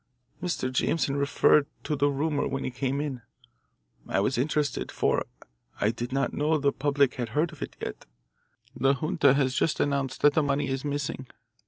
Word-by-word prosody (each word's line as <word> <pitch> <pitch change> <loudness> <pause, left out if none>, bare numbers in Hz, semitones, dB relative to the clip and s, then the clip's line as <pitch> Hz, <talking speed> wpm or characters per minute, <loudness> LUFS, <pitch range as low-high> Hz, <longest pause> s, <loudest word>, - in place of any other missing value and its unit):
"Mr. 170 -8 -2
Jameson 140 0 +1
referred 140 +1 +3 0.2
to 150 - -1
the 145 0 +2
rumour 145 +1 0
when 135 0 -3
he - - -3
came 135 +2 -2
in. 140 -4 -3 0.9
I - - +1
was 105 +7 +1
interested, 145 +2 -1
for - - 0 0.5
I 105 - +2
did 120 +2 -5
not 135 +1 0
know 155 +2 +1
the 140 -1 +2
public 140 -2 +2
had 120 -2 -3
heard 165 +3 +2
of 155 - -14
it - - -5
yet. - - -6 0.7
The 135 +1 +3
junta 155 -1 +3
has 135 -2 +1
just 150 - +1
announced 140 -2 -1
that 145 0 +6
the 155 - +3
money 140 -1 0
is 135 0 -2
missing. 140 -2 -3
140 Hz, 180 wpm, -27 LUFS, 135-145 Hz, 0.9 s, that